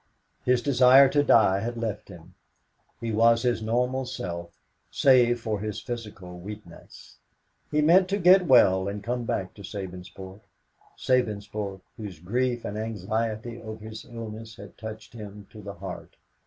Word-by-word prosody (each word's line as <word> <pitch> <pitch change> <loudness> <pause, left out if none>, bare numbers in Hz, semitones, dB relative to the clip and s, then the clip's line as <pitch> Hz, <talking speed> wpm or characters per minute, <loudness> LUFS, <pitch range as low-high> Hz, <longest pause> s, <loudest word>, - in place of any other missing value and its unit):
His 125 -1 +2
desire 135 0 +7
to 145 +1 +3
die 105 -8 +4
had 120 +3 -4
left 110 -3 -4
him. 90 -1 -13 0.7
He 115 -1 -3
was 115 +2 +4
his 120 -3 +1
normal 125 +4 0
self, 85 -4 -6 0.3
save 120 -3 +4
for 110 -2 -2
his 105 0 -4
physical 105 -7 -7
weakness. 100 -2 -12 0.5
He 150 0 +1
meant 180 +4 +5
to 200 - +1
get 180 -1 +6
well 95 -8 +5
and 100 0 -5
come 120 +2 -2
back 95 -4 -2
to 100 - -13
Sabinsport 95 0 -8 0.6
Sabinsport, 105 -5 -1 0.2
whose 105 -7 -7
grief 120 +8 -1
and 105 +1 -4
anxiety 110 +2 -3
over 110 -1 -8
his 110 0 -8
illness 115 -2 -8
had 100 -1 -12
touched 110 0 -9
him 105 -3 -9
to 110 - -11
the 100 0 -8
heart? 90 0 -8
110 Hz, 150 wpm, -26 LUFS, 100-120 Hz, 0.7 s, desire